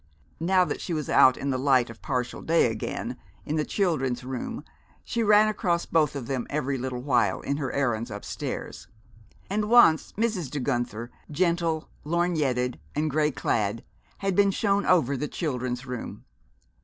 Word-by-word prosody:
Now 180 Hz, +2 st, +3 dB
that 150 Hz, -, -4 dB
she 175 Hz, -, -3 dB
was 155 Hz, -2 st, -3 dB
out 130 Hz, -1 st, +6 dB
in 140 Hz, -, -2 dB
the 130 Hz, -, -1 dB
light 130 Hz, -3 st, +3 dB
of 115 Hz, -, -15 dB
partial 125 Hz, -4 st, -2 dB
day 165 Hz, -7 st, +3 dB
again, 110 Hz, -, -4 dB, 0.3 s
in 150 Hz, -, -2 dB
the 155 Hz, -, +1 dB
Children's 135 Hz, -11 st, 0 dB
Room, 130 Hz, 0 st, -5 dB, 0.4 s
she 235 Hz, -, -2 dB
ran 210 Hz, 0 st, +6 dB
across 180 Hz, -5 st, 0 dB
both 155 Hz, -3 st, +2 dB
of 135 Hz, -4 st, -4 dB
them 130 Hz, -1 st, -3 dB
every 140 Hz, -2 st, -1 dB
little 125 Hz, -1 st, -4 dB
while 130 Hz, -3 st, +2 dB
in 140 Hz, -, -2 dB
her 135 Hz, -4 st, -2 dB
errands 120 Hz, -4 st, 0 dB
upstairs; 105 Hz, -1 st, -6 dB, 0.6 s
and 210 Hz, +2 st, -1 dB
once 235 Hz, -10 st, +6 dB
Mrs. 210 Hz, -, -1 dB
De 145 Hz, -, -3 dB
Guenther, 120 Hz, -3 st, -2 dB, 0.2 s
gentle, 170 Hz, 0 st, 0 dB, 0.2 s
lorgnetted 150 Hz, -7 st, 0 dB, 0.2 s
and 155 Hz, +1 st, 0 dB
gray 150 Hz, +1 st, +2 dB
clad, 110 Hz, -5 st, -1 dB, 0.3 s
had 195 Hz, -2 st, -1 dB
been 200 Hz, 0 st, +5 dB
shown 200 Hz, 0 st, +1 dB
over 140 Hz, -7 st, +3 dB
the 150 Hz, +3 st, -2 dB
Children's 125 Hz, -6 st, -3 dB
Room. 125 Hz, -2 st, -6 dB
145 Hz, 165 wpm, -26 LUFS, 125-175 Hz, 0.6 s, out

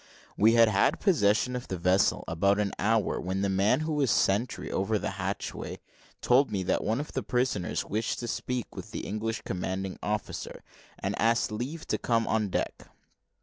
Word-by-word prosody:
We 110 Hz, +2 st, +5 dB
had 115 Hz, -1 st, +7 dB
had 105 Hz, -2 st, +2 dB
possession 125 Hz, -, +2 dB
of 125 Hz, 0 st, -5 dB
the 95 Hz, -, -3 dB
vessel 90 Hz, +3 st, +2 dB
about 100 Hz, +5 st, +2 dB
an 105 Hz, -2 st, 0 dB
hour, 110 Hz, 0 st, +1 dB
when 95 Hz, +2 st, -2 dB
the 100 Hz, -, +1 dB
man 100 Hz, +8 st, +2 dB
who 155 Hz, 0 st, -1 dB
was 145 Hz, -4 st, +1 dB
sentry 105 Hz, +5 st, +1 dB
over 105 Hz, +3 st, 0 dB
the -, -, -3 dB
hatchway 95 Hz, +1 st, -4 dB, 0.4 s
told 130 Hz, +3 st, +4 dB
me 95 Hz, -3 st, -2 dB
that 90 Hz, -, 0 dB
one 110 Hz, +4 st, 0 dB
of 150 Hz, -, -5 dB
the -, -, -2 dB
prisoners 125 Hz, -7 st, -1 dB
wished 110 Hz, +2 st, -2 dB
to 120 Hz, -, -4 dB
speak 125 Hz, 0 st, -3 dB
with -, -, -7 dB
the -, -, -5 dB
English 110 Hz, +2 st, -3 dB
commanding 95 Hz, +1 st, -3 dB
officer, 105 Hz, +1 st, -4 dB, 0.3 s
and -, -, -2 dB
asked 115 Hz, 0 st, +2 dB
leave 130 Hz, +9 st, -4 dB
to -, -, -1 dB
come 115 Hz, -1 st, +1 dB
on 110 Hz, -2 st, 0 dB
deck. -, -, -3 dB
110 Hz, 185 wpm, -28 LUFS, 95-120 Hz, 0.4 s, had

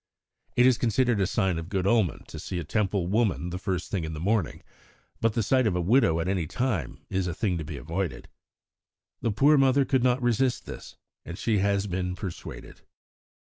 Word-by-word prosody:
(It 125 Hz, -, +5 dB
is 130 Hz, -2 st, +4 dB
considered 120 Hz, -1 st, +2 dB
a 95 Hz, -, +2 dB
sign 95 Hz, -5 st, 0 dB
of 80 Hz, +1 st, -7 dB
good 95 Hz, -2 st, -1 dB
omen 100 Hz, -5 st, +2 dB
to -, -, -8 dB
see 90 Hz, -, -5 dB
a 85 Hz, -, -2 dB
Temple 100 Hz, +1 st, 0 dB
woman 95 Hz, -3 st, 0 dB
the 90 Hz, -, -4 dB
first 90 Hz, -2 st, -3 dB
thing 95 Hz, -5 st, -1 dB
in 80 Hz, 0 st, -4 dB
the 75 Hz, -, -5 dB
morning; 100 Hz, 0 st, -1 dB, 0.6 s
but 115 Hz, -1 st, +1 dB
the 115 Hz, -, 0 dB
sight 130 Hz, +3 st, +3 dB
of 95 Hz, -, 0 dB
a -, -, +1 dB
widow 90 Hz, -3 st, +3 dB
at 85 Hz, -, -2 dB
any 95 Hz, -4 st, 0 dB
time 110 Hz, -, -2 dB
is 95 Hz, -1 st, 0 dB
a 85 Hz, -, -3 dB
thing 95 Hz, -4 st, 0 dB
to -, -, -4 dB
be 75 Hz, -1 st, -7 dB
avoided.) 85 Hz, -3 st, -4 dB, 0.9 s
The -, -, 0 dB
poor 140 Hz, +8 st, +4 dB
mother 135 Hz, 0 st, +4 dB
could 130 Hz, -2 st, +2 dB
not 125 Hz, 0 st, +3 dB
resist 120 Hz, +1 st, +1 dB
this, -, -, -9 dB, 0.3 s
and 85 Hz, -, -7 dB
she 110 Hz, -1 st, +1 dB
has 100 Hz, 0 st, +1 dB
been 90 Hz, -1 st, -2 dB
persuaded." 90 Hz, -1 st, -8 dB
100 Hz, 205 wpm, -27 LUFS, 90-120 Hz, 0.9 s, It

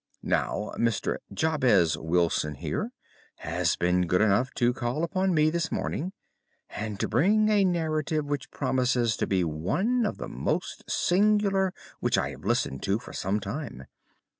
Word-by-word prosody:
Now, 105 Hz, -, -1 dB
Mr. 115 Hz, -2 st, 0 dB
Jabez 120 Hz, -, +3 dB
Wilson 80 Hz, -2 st, 0 dB
here -, -, -3 dB, 0.4 s
has 85 Hz, +1 st, -1 dB
been 90 Hz, 0 st, +1 dB
good 90 Hz, +2 st, +2 dB
enough 110 Hz, +4 st, +3 dB
to 120 Hz, 0 st, +2 dB
call 125 Hz, +5 st, -2 dB
upon 185 Hz, +2 st, +1 dB
me 155 Hz, -2 st, +3 dB
this 170 Hz, -1 st, -1 dB
morning, 180 Hz, +4 st, -2 dB, 0.6 s
and 105 Hz, -2 st, -5 dB
to -, -, 0 dB
begin 210 Hz, -, +3 dB
a 205 Hz, -2 st, +4 dB
narrative 155 Hz, -4 st, 0 dB
which 145 Hz, -2 st, -3 dB
promises 125 Hz, -3 st, +1 dB
to -, -, -1 dB
be 95 Hz, -2 st, +1 dB
one 185 Hz, -, 0 dB
of -, -, -4 dB
the -, -, -5 dB
most -, -, -3 dB
singular 195 Hz, 0 st, +2 dB, 0.3 s
which -, -, +1 dB
I -, -, 0 dB
have -, -, -11 dB
listened 65 Hz, -, 0 dB
to 100 Hz, +1 st, +1 dB
for 115 Hz, -, -11 dB
some 100 Hz, +3 st, -1 dB
time. 105 Hz, -, -6 dB
125 Hz, 155 wpm, -27 LUFS, -, 0.6 s, a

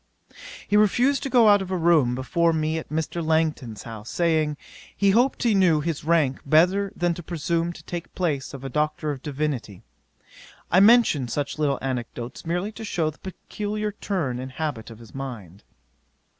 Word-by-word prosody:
'He 205 Hz, -, +1 dB
refused 245 Hz, +7 st, +3 dB
to 275 Hz, -, -3 dB
go 240 Hz, -4 st, +5 dB
out 205 Hz, -1 st, +6 dB
of 190 Hz, -, -5 dB
a 185 Hz, -, -1 dB
room 160 Hz, -8 st, +3 dB
before 165 Hz, +6 st, +1 dB
me 160 Hz, 0 st, 0 dB
at -, -, -10 dB
Mr. 160 Hz, +2 st, -2 dB
Langton's 155 Hz, -8 st, -1 dB
house, 110 Hz, -1 st, -9 dB
saying, 155 Hz, -3 st, +1 dB, 0.4 s
he 200 Hz, -1 st, +4 dB
hoped 245 Hz, +7 st, +2 dB
he 235 Hz, -3 st, +3 dB
knew 180 Hz, -6 st, +4 dB
his 160 Hz, 0 st, -3 dB
rank 155 Hz, -5 st, +2 dB
better 180 Hz, +7 st, +3 dB
than 175 Hz, -1 st, 0 dB
to 175 Hz, -, -7 dB
presume 170 Hz, 0 st, -2 dB
to 160 Hz, -, -12 dB
take 175 Hz, +1 st, -7 dB
place 150 Hz, -7 st, -1 dB
of 135 Hz, -2 st, -9 dB
a -, -, -4 dB
Doctor 150 Hz, +2 st, -1 dB
in 135 Hz, -, -8 dB
Divinity. 140 Hz, -, -4 dB, 0.9 s
I 185 Hz, -, +6 dB
mention 205 Hz, -, +5 dB
such 145 Hz, +5 st, -3 dB
little 145 Hz, -2 st, +1 dB
anecdotes, 125 Hz, +1 st, -5 dB
merely 180 Hz, +5 st, -1 dB
to 220 Hz, +1 st, -9 dB
shew 165 Hz, -7 st, -1 dB
the 150 Hz, -, -22 dB
peculiar 210 Hz, +2 st, -4 dB
turn 170 Hz, -12 st, -3 dB
and 130 Hz, 0 st, -7 dB
habit 145 Hz, -7 st, -4 dB
of 115 Hz, -, -11 dB
his 115 Hz, -1 st, -15 dB
mind. 110 Hz, -9 st, -8 dB
160 Hz, 180 wpm, -24 LUFS, 135-185 Hz, 0.9 s, out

